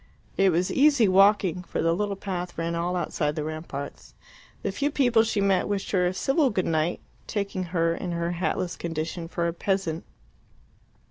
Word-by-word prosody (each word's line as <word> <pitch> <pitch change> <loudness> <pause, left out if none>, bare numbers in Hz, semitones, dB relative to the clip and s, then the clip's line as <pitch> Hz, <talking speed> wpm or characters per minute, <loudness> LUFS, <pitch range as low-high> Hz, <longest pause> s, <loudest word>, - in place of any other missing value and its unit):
It 195 -1 +4
was 175 +2 +1
easy 280 -5 +5
walking, 195 -1 +4
for 180 - -6
a 165 0 +2
little 200 +2 -1
path 180 -3 -5
ran 165 0 -1
all 170 +2 -1
outside 150 -4 -1
the 155 - -2
ramparts. 155 -2 -7 0.5
The - - -1
few 285 +1 0
people 245 -6 +3
she 220 -2 0
met 195 -2 +2
wished 200 -1 -2
her 180 -2 +3
a 180 - -1
civil 270 - +2
good 190 -5 -1
night, 160 +1 0 0.3
taking 200 -3 -2
her, 165 -1 +1
in 175 +1 -4
her 170 0 -1
hatless 175 0 -1
condition, 165 +1 -4
for 170 0 -1
a 170 - -2
peasant. 175 -3 -1
180 Hz, 180 wpm, -26 LUFS, 170-200 Hz, 0.5 s, easy